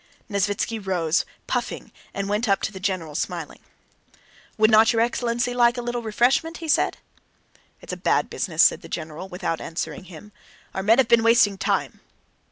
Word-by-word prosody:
Nesvítski 205 +1 -1
rose, 175 -3 0 0.2
puffing, - - -3 0.2
and 200 0 -4
went 210 +3 -1
up 195 - +2
to - - -1
the 190 - -9
general, 185 -5 -3
smiling. 170 0 -4 1.0
"Would 215 +1 +4
not 220 +1 +6
your 225 -1 +1
excellency 240 0 -1
like 240 0 +3
a 245 - -3
little 240 0 -3
refreshment?" 245 +9 +1
he 330 - -7
said. 300 - +2 0.8
"It's - - -7
a - - -5
bad - - +1
business," - - +1
said - - +4
the - - -12
general 155 +4 -6
without 180 -3 -3
answering 165 +2 -5
him, 185 +3 -12 0.4
"our 190 - -2
men 220 +4 +4
have 265 -3 +4
been 235 -1 +5
wasting 230 -3 +4
time." 190 - -1
210 Hz, 175 wpm, -23 LUFS, 190-235 Hz, 1.0 s, not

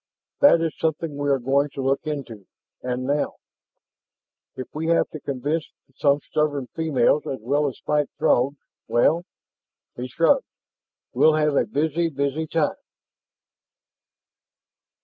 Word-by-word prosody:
"That 280 -12 +6
is 165 -2 -1
something 160 -1 -1
we 145 0 -1
are 140 - +4
going 135 +3 +1
to 135 - -3
look 135 +3 0
into, 120 -10 -5 0.3
and 125 0 -3
now! 145 +3 -1 1.2
If 130 - -6
we 160 +2 -3
have 170 - +3
to 155 - -8
convince 145 +4 -2 0.3
some 140 0 +2
stubborn 145 -3 -1
females, 150 -3 +2
as 135 - -3
well 145 +6 +1
as 135 - -5
fight 150 -1 +1
Throgs, 135 +4 +2 0.3
well" 150 +8 +3 0.7
he 125 +1 -5
shrugged 165 - +2 0.7
"we'll 155 0 +5
have 150 -2 +2
a - - +2
busy, 160 +3 0
busy, 140 +2 -2
time." 155 -2 0
145 Hz, 130 wpm, -23 LUFS, 135-155 Hz, 1.2 s, That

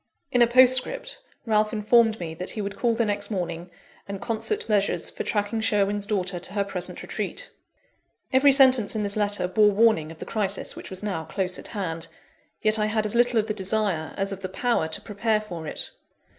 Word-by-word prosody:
In 245 - +2
a 240 - +7
postscript, 255 - +4 0.3
Ralph 215 -1 +2
informed 225 0 +3
me 165 -2 -5
that 180 +3 -5
he 215 - -2
would 200 0 -5
call 235 -2 +1
the 230 - +1
next 205 -1 -2
morning, 175 -3 -4 0.4
and 200 -1 -5
concert 235 - -1
measures 205 -2 0
for - - -6
tracking 210 +1 -1
Sherwin's 205 -2 +1
daughter 185 -4 -1
to 180 +3 -7
her 200 -1 +1
present 185 -3 -6
retreat. - - -5 0.8
Every 275 +2 +6
sentence 260 -6 +5
in 215 - -1
this 200 0 -2
letter 205 -3 +2
bore 210 +3 +4
warning 205 -7 +2
of 165 - -12
the - - -7
crisis 200 -3 -2
which - - -9
was 190 +1 -6
now 190 -6 -3
close 180 +3 -2
at - - -5
hand; 165 -4 -4 0.6
yet 215 0 +3
I 210 - +1
had 215 0 0
as 210 - 0
little 240 0 +3
of 215 - +2
the 215 - -2
desire 195 -5 -1
as 195 0 -1
of 195 0 -6
the 185 - -4
power 230 -3 0
to 160 - -5
prepare 215 +1 0
for 175 -7 -8
it. - - -4
210 Hz, 205 wpm, -25 LUFS, 190-225 Hz, 0.8 s, a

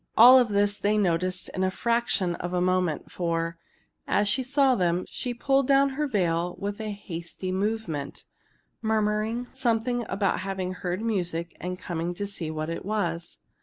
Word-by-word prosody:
All 250 +3 +10
this 205 -2 +1
they 210 +1 +2
noticed 180 -1 0
in 185 - -4
the 190 - +3
fraction 215 -4 0
of 175 +1 -4
a - - +2
moment, 180 -3 0
for, 165 -1 -2 0.5
as 205 - +2
she 260 +6 +2
saw 270 +1 +3
them, 180 -4 +1
she 250 - -4
pulled 270 +2 +1
down 275 0 +5
her 295 +2 -1
veil 175 -6 0
with 205 +2 -4
a 215 - -3
hasty 185 -2 -6
movement, 190 -7 -3 0.6
murmuring 220 +2 0
something 245 -1 0
about 195 0 0
having 190 -1 -3
heard 180 +2 -3
music 175 -6 -1
and 180 0 -3
coming 175 0 -3
to 205 - -3
see 190 -5 -5
what 155 +1 -3
it 165 - -4
was. 175 -5 -2
195 Hz, 165 wpm, -27 LUFS, 175-225 Hz, 0.6 s, All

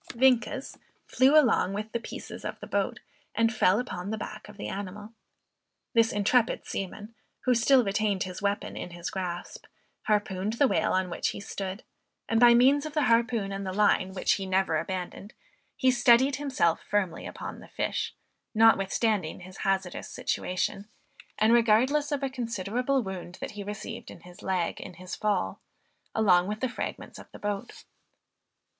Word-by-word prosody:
Vienkes 260 +2 +2 0.3
flew 275 +4 +5
along 230 -8 +2
with 215 +2 -4
the 235 - -1
pieces 230 - -8
of - - -5
the - - -8
boat, - - -1 0.3
and 230 0 +2
fell 205 -1 +3
upon 195 -6 -4
the 220 - -2
back 210 - -7
of 210 - -13
the - - -5
animal. 205 +3 -6 0.8
This 230 -1 +4
intrepid 215 +3 +2
seaman, 205 +3 -5 0.3
who 255 - +3
still 250 +2 +5
retained 200 -1 0
his 185 +1 -7
weapon 200 +1 -1
in - - -5
his 175 0 -6
grasp, 180 -2 -5 0.4
harpooned 205 -1 0
the 270 +4 +4
whale - - +1
on 185 -1 0
which - - -1
he - - -3
stood; 195 +1 -5 0.4
and 225 - +2
by 240 0 +8
means 275 +5 +4
of 310 - -10
the 300 - +3
harpoon 230 -4 +2
and 195 0 -4
the 190 - -3
line, 190 -1 +2
which 185 - +1
he 195 -1 -3
never 190 -4 +2
abandoned, 185 +4 -5 0.4
he 260 - +3
steadied 250 +2 +4
himself 260 - +1
firmly 195 -5 -1
upon - - -7
the - - -13
fish, - - -2 0.4
notwithstanding 210 -4 +3
his 185 +1 -11
hazardous 190 -2 -1
situation, 185 +2 -2 0.5
and 220 +2 +4
regardless 245 +6 +3
of 285 -1 -1
a 270 - 0
considerable 245 +2 -1
wound 185 -2 -6
that - - -5
he 205 - -7
received 205 +1 -7
in 170 - -12
his 180 0 -14
leg 185 -3 -1
in 180 - -9
his 185 +1 -7
fall 200 - -1 0.5
along 185 -5 +4
with 210 +1 -3
the 260 - -1
fragments - - -6
of - - -13
the - - -10
boat. 205 +3 -5
210 Hz, 170 wpm, -28 LUFS, 190-235 Hz, 0.8 s, by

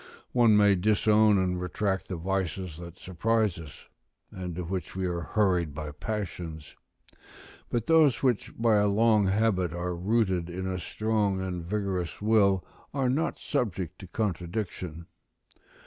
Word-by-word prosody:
One 115 -4 +5
may 105 -1 +6
disown 105 +2 +4
and 90 -1 0
retract 95 +1 -1
the 95 - -4
vices 90 -1 -3
that 85 0 -10
surprise 105 +1 0
us, 80 -3 -11 0.5
and 90 -2 -6
to 90 - -3
which 90 +2 -4
we 95 0 -1
are 90 -1 -1
hurried 90 -5 +1
by 75 -1 -5
passions; 85 -4 -5 0.9
but 120 -2 -1
those 155 -7 +4
which 125 -5 +1
by 115 -2 +3
a 105 0 +3
long 105 0 +3
habit 95 -4 +1
are 90 +1 -3
rooted 95 -2 0
in 95 +2 -4
a 95 -1 -2
strong 105 0 0
and 90 -2 -3
vigorous 95 -2 -2
will 100 -3 +3 0.3
are 135 -2 +1
not 150 +6 0
subject 95 - -2
to 95 - -9
contradiction. 90 -4 -3
95 Hz, 145 wpm, -28 LUFS, 90-110 Hz, 0.9 s, may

